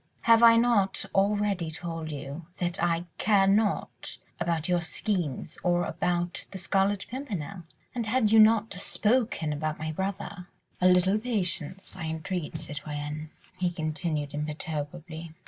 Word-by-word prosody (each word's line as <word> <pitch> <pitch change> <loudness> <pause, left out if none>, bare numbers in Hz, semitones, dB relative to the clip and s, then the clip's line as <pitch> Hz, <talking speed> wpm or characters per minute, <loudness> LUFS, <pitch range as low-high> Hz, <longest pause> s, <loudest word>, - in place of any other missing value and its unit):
Have 230 0 +6
I 230 -1 +9
not 230 -5 +3
already 200 -3 +1
told 165 0 -5
you 145 +2 -6
that 175 0 -1
I 170 0 +1
care 200 -3 +4
nought 205 +2 0 0.2
about 165 -2 0
your 175 -1 +2
schemes 175 -5 -2
or 175 0 +2
about 175 +1 -1
the 195 - -7
Scarlet 195 +2 +1
Pimpernel. 200 - -5 0.3
And 235 -3 -2
had 220 -1 +3
you 225 - +7
not 220 0 +5
spoken 210 -4 +1
about 155 +1 -2
my 155 +1 -3
brother.. 190 +1 -4 0.2
." - - -36
"A 180 - +6
little 185 +3 +4
patience, 195 -6 -1
I 160 - -5
entreat, 160 +1 -3
citoyenne," 150 0 -5 0.3
he 180 -1 +2
continued 155 -3 -2
imperturbably. 155 +2 -5
175 Hz, 140 wpm, -28 LUFS, 155-205 Hz, 0.3 s, I